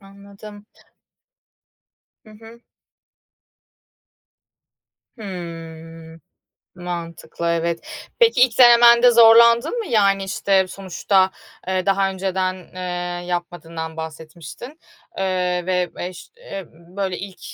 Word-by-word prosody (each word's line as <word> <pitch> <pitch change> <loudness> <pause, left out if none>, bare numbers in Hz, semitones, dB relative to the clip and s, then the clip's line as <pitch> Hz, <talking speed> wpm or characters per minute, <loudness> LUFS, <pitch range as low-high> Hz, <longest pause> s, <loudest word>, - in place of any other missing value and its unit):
Anladım. 200 +1 -14 1.6
Hı 215 - -17
hı. 225 +2 -16 2.6
Hımm. 165 -4 -9 0.5
Mantıklı, 170 -1 -7
evet. 170 0 -4
Peki 460 - +3
ilk 250 -3 +2
denemende 240 0 +7
zorlandın 235 - +5
mı? 455 - -4
Yani, 200 - +2
işte, 195 0 +1
sonuçta, 190 0 0 0.4
eee, 185 -1 -1
daha 195 0 +1
önceden, 190 -1 -2 0.2
eee, 180 -1 -5
yapmadığından 170 -2 -5
bahsetmiştin, 160 - -10 0.4
eee, 180 -2 -1
ve 180 -1 -1
eş 180 0 -7
eee, 195 - -9
böyle, 180 +3 -6
ilk 195 -2 -9
185 Hz, 90 wpm, -20 LUFS, 175-210 Hz, 2.6 s, denemende